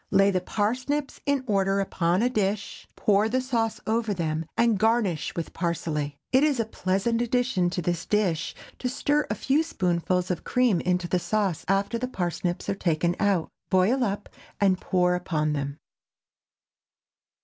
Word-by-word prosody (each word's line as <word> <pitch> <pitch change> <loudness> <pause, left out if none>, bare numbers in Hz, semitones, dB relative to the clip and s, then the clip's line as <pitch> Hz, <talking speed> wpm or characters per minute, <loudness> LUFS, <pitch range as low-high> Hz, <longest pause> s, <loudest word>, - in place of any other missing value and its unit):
Lay 195 0 +4
the 185 -1 0
parsnips 250 +9 -2
in 280 -2 +1
order 195 -3 +1
upon 185 0 +1
a 245 - +3
dish, 205 -2 -2
pour 210 +1 +2
the 255 +3 +1
sauce 235 -4 -1
over 220 -2 0
them, 160 -2 -2
and 230 -4 +3
garnish 220 -7 +1
with 170 - -4
parsley. 150 -4 -2
It 260 +2 +5
is 295 -5 +2
a 230 - +1
pleasant 215 +3 0
addition 240 -6 +1
to 180 0 -3
this 175 0 -2
dish 185 -6 0 0.2
to 250 - -1
stir 290 +3 +1
a 210 - 0
few 275 +8 +2
spoonfuls 180 - 0
of 175 - -3
cream 245 -8 +2
into 180 -1 0
the 180 - +1
sauce 200 -3 -1
after 200 +4 +1
the 255 - -2
parsnips 175 -4 -2
are - - +1
taken 170 -2 0
out; 195 -5 +1 0.2
boil 195 +8 +3
up, 205 -2 -2 0.3
and 190 -2 +3
pour 180 -1 +2
upon 155 -4 -1
them. 140 0 -3
195 Hz, 160 wpm, -26 LUFS, 175-230 Hz, 0.3 s, It